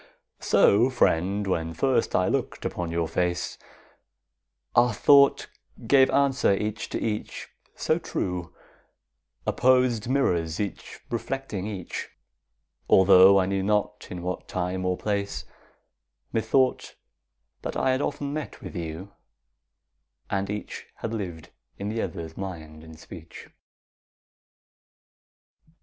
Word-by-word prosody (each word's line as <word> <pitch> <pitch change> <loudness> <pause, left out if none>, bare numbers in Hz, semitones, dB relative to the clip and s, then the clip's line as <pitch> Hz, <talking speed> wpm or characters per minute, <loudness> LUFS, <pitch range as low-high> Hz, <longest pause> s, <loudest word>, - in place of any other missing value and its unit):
So, 115 +6 +4
friend, 100 -4 +1
when 80 -3 -2
first 125 - +1
I 90 - +3
look'd - - -2
upon 85 -1 -3
your 85 0 -1
face, 85 +1 -2 1.1
Our 120 -1 +4
thought 140 +3 +5 0.4
gave 130 +2 +5
answer 140 -7 +3
each 105 +2 -3
to - - -3
each, 105 -1 -4 0.3
so - - 0
true— 90 -1 -3 0.9
Opposed 125 -3 +2
mirrors 85 - +1
each 100 -3 -5
reflecting 115 -4 -3
each— 95 -5 -5 0.8
Altho' 95 0 +7
I 95 - +3
knew 95 0 -1
not 105 +1 -1
in 90 -1 -6
what 90 0 -4
time 90 +1 -2
or 90 -1 0
place, 100 -1 -2 0.9
Methought 115 +4 +1 0.7
that - - -4
I 130 - +2
had 130 +2 0
often 145 0 -3
met 155 0 -5
with - - -9
you, 85 +3 -6 1.2
And 100 0 -1
each 105 0 -6
had 115 - -5
lived 90 -7 -6 0.3
in 100 +1 -4
the 110 +1 -2
other's 80 -2 -5
mind 80 -5 -7
and 80 -1 -12
speech. 85 -2 -11
100 Hz, 115 wpm, -26 LUFS, 90-115 Hz, 1.2 s, Altho